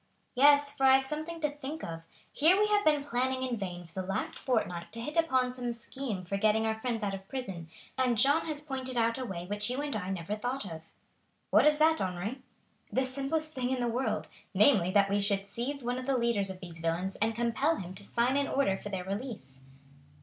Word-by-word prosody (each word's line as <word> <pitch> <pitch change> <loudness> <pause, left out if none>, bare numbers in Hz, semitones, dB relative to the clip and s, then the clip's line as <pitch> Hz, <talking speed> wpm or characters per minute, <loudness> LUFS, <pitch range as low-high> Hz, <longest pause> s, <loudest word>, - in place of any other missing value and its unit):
"Yes, 285 +2 +5
for 270 -2 +3
I 265 - +8
have 265 0 +2
something 310 +4 -4
to 300 - +2
think 295 +2 -7
of. 165 -1 -5 0.3
Here 320 +5 +5
have 420 0 +3
we - - +9
been 295 -2 -1
planning 260 -1 -1
in 255 -2 -1
vain 180 -4 -5
for 170 +3 -5
the 185 - -8
last 195 +2 -2
fortnight 180 -9 -1
to 230 - -4
hit 295 +6 -5
upon 260 -7 +2
some 245 -1 -3
scheme 235 -4 -5
for 195 +3 -2
getting 215 +2 +3
our 220 - +2
friends 225 0 -3
out 200 -1 -1
of 195 0 -7
prison, 195 -12 -5 0.3
and 250 -3 +2
Jeanne 285 +9 +3
has 300 -2 -1
pointed 260 -3 -4
out 230 +2 +2
a 255 - -3
way 175 -6 -5
which 205 +3 -2
you 250 +2 -2
and 290 -3 -2
I 190 -3 -3
never 190 +1 -3
thought 245 +3 -3
of." 160 -3 -8 0.6
"What - - +6
is 300 0 +5
that, 315 +1 +4
Henri?" 190 +8 -3 0.5
"The 260 - +1
simplest 280 +4 -2
thing 250 -3 -1
in 260 -1 0
the 240 - 0
world, 245 +3 -1 0.3
namely, 205 -11 +5
that 200 +1 +4
we 200 +1 +1
should 200 -1 0
seize 250 +6 -3
one 245 +1 -1
of 255 - -7
the 270 -1 +2
leaders 235 -5 +1
of 185 -1 -8
these 170 -3 -9
villains 165 +4 -1
and 225 +1 0
compel 240 +7 +1
him 180 - -6
to 195 +2 -10
sign 240 +6 +1
an 285 - +1
order 195 -9 +1
for 205 - -7
their 190 -2 -3
release." 195 - -6
240 Hz, 230 wpm, -30 LUFS, 195-270 Hz, 0.6 s, we